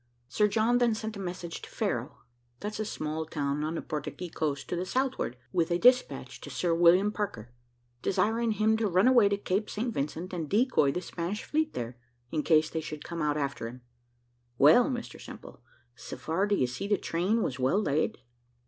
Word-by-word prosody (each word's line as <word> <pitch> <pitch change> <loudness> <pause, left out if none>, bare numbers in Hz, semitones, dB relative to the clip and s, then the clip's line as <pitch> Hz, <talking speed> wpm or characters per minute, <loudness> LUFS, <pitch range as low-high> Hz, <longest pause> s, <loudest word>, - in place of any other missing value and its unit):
Sir 210 - +2
John 225 +4 +2
then 235 -2 +3
sent 220 0 -5
a - - -7
message 175 -2 -5
to - - -10
Ferro - - -3 0.4
that's 210 +1 -5
a 215 - -1
small 155 -5 -3
town 145 -2 -2
on 155 +2 -2
the - - -4
Portuguese 155 +3 -5
coast 145 -3 -2
to - - -1
the 175 - -1
southward 255 - -1 0.2
with 170 -2 +2
a 175 - +2
despatch 250 +5 +2
to - - -8
Sir 175 -2 0
William 175 +4 +5
Parker, 120 - -4 0.5
desiring 225 +3 +1
him 215 +1 +2
to 220 -1 +1
run 185 +4 +3
away 240 -6 +6
to 200 - +1
Cape 200 +1 -1
St. 230 +2 -2
Vincent, 160 +5 -3
and 165 -4 -3
decoy 215 - +3
the 180 - -3
Spanish 180 +5 -4
fleet 310 0 0
there, 120 0 -4 0.3
in 155 - 0
case 155 0 +4
they 160 - -2
should 155 -1 -7
come 170 -1 -4
out 150 -1 +1
after 140 -5 -2
him. 125 +2 -10 0.8
Well, 155 - +7
Mr 245 -2 -5
Simple, - - -11 0.3
so - - -8
far 175 +6 0
d'ye 200 -10 +2
see 125 +11 -4
the 205 -1 +2
train 190 +7 0
was 130 - -3
well 130 +10 +2
laid. 155 -7 0
180 Hz, 195 wpm, -29 LUFS, 150-215 Hz, 0.8 s, Well